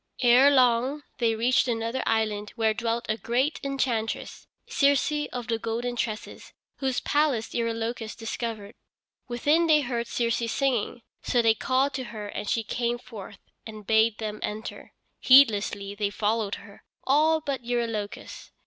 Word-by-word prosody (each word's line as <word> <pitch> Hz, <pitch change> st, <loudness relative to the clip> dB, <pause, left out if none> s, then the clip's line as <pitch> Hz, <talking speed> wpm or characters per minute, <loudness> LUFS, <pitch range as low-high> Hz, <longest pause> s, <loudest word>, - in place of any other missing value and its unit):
Ere 250 Hz, +3 st, +7 dB
long 260 Hz, +2 st, +3 dB, 0.2 s
they 230 Hz, -2 st, +2 dB
reached 245 Hz, +4 st, +2 dB
another 230 Hz, +2 st, -1 dB
island, 215 Hz, -2 st, -1 dB
where 220 Hz, -1 st, +2 dB
dwelt 230 Hz, +1 st, -2 dB
a 215 Hz, -, -1 dB
great 255 Hz, +7 st, 0 dB
enchantress, 250 Hz, -5 st, -2 dB, 0.2 s
Circe 285 Hz, +1 st, +2 dB
of 245 Hz, -2 st, -5 dB
the 225 Hz, -2 st, -1 dB
golden 235 Hz, +2 st, -3 dB
tresses, 220 Hz, -2 st, -5 dB, 0.2 s
whose 265 Hz, -2 st, -1 dB
palace 290 Hz, -7 st, 0 dB
Eurylochus 230 Hz, -1 st, -3 dB
discovered. 225 Hz, -2 st, -5 dB, 0.5 s
Within 295 Hz, +7 st, +2 dB
they 305 Hz, -2 st, +5 dB
heard 240 Hz, -3 st, -3 dB
Circe 235 Hz, -1 st, -1 dB
singing, 250 Hz, -4 st, -1 dB, 0.2 s
so 240 Hz, -1 st, +1 dB
they 225 Hz, -1 st, +5 dB
called 260 Hz, +5 st, 0 dB
to 260 Hz, -1 st, -4 dB
her 210 Hz, -2 st, -7 dB
and 205 Hz, 0 st, -5 dB
she 225 Hz, -, 0 dB
came 240 Hz, +2 st, -1 dB
forth 215 Hz, -5 st, -10 dB, 0.3 s
and 215 Hz, -2 st, -10 dB
bade 220 Hz, 0 st, +3 dB
them 215 Hz, -1 st, -5 dB
enter. 215 Hz, +2 st, -6 dB, 0.3 s
Heedlessly 210 Hz, -6 st, +4 dB
they 205 Hz, 0 st, -1 dB
followed 210 Hz, 0 st, -1 dB
her, 200 Hz, -2 st, -14 dB, 0.2 s
all 310 Hz, +4 st, +3 dB
but 280 Hz, -4 st, -4 dB
Eurylochus. 230 Hz, -4 st, -4 dB
235 Hz, 145 wpm, -26 LUFS, 220-260 Hz, 0.5 s, Ere